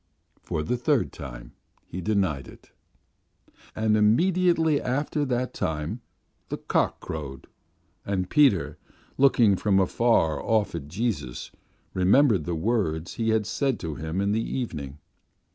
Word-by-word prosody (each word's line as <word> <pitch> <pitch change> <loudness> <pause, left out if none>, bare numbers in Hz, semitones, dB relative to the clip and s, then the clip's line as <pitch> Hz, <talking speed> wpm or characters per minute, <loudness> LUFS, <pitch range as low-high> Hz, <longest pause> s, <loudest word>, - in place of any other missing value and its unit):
For 75 - -3
the 125 +11 -1
third 125 +1 +1
time - - -9 0.3
he 90 - -6
denied 90 - 0
it. - - -16 1.0
And 110 0 +2
immediately 160 - +3
after 145 +3 -1
that 125 -1 -1
time 80 +9 -3 0.5
the - - -3
cock - - 0
crowed, 70 -4 -7 0.6
and 95 -2 -2
Peter, 95 - +3 0.4
looking 120 -7 +5
from 95 0 +2
afar 95 -4 +2
off 110 -2 +1
at 80 -4 -5
Jesus, 80 - -3 0.4
remembered 100 +5 +4
the 85 - -2
words 80 -4 -1
He 115 -1 -1
had 110 -1 +2
said 130 +4 -1
to 80 -3 -4
him 80 +5 -3
in 100 +1 +1
the 110 +2 +1
evening.... 75 - -4
100 Hz, 130 wpm, -26 LUFS, 80-120 Hz, 1.0 s, looking